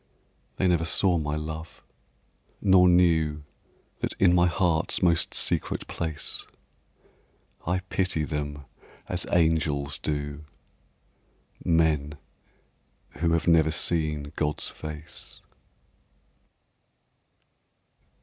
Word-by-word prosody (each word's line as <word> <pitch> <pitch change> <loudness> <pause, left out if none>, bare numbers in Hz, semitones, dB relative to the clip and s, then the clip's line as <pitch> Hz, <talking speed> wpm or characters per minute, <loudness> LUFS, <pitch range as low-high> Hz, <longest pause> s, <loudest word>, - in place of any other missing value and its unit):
They 95 - +1
never 85 -2 +2
saw 85 +2 +2
my 75 -1 -2
love, 80 +1 -7 0.8
nor 95 -2 +5
knew 80 -4 +3 0.6
That - - -3
in 90 -2 +5
my 90 0 +4
heart's 85 -1 +1
most 85 -2 +2
secret - - -1
place 80 -3 -3 1.2
I 90 +1 +1
pity 90 -3 -1
them 75 -1 -4 0.4
as - - -3
angels 80 -4 +1
do 75 0 -3 1.2
Men 75 -3 +1 1.0
who 85 0 +2
have 80 -2 +1
never 80 -2 +5
seen 75 -3 -1
God's 75 -1 -1
face. 75 0 -7
80 Hz, 90 wpm, -26 LUFS, 75-85 Hz, 1.2 s, nor